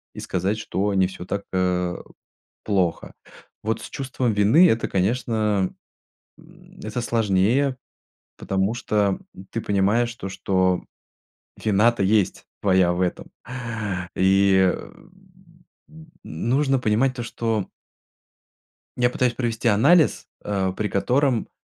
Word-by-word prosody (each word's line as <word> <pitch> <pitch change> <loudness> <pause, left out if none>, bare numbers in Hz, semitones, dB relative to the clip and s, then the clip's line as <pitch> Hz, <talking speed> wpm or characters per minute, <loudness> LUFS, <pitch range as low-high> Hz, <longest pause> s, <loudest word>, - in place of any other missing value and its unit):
и - - -7
сказать, 95 +4 -2
что 100 -1 -1
не 95 -1 +3
всё 90 -1 -9
так, 100 +2 -3
э, 90 -1 0 0.7
плохо. 95 -5 0 0.5
Вот 110 +1 -1
с - - -8
чувством 130 -4 -2
вины- 110 - +5
это, 115 -3 +1
конечно, 105 -1 0 0.7
м, - - -19
это 110 +3 -4
сложнее, 115 +4 +1 0.6
потому 95 +2 -1
что, 105 -5 0 0.2
м, 95 - -12
ты 115 - -3
понимаешь 105 +4 +1
то, 95 - -6
что 95 -1 0 0.8
вина-то 110 +1 +3
есть 100 0 +1 0.2
твоя 95 -3 +3
в 90 - -3
этом. 90 - -3 0.9
И, 95 -1 +4
м, 180 - -12 0.8
м, 160 0 -15
нужно 135 - 0
понимать 125 +3 +1
то, 120 - -5
что 115 -3 -2 1.3
Я 120 0 +2
пытаюсь 125 -1 0
провести 115 -2 -1
анализ, 145 +10 +4 0.2
а, 95 -2 -1
при 105 +3 -2
котором, 125 +5 +1
105 Hz, 120 wpm, -23 LUFS, 95-120 Hz, 1.3 s, вины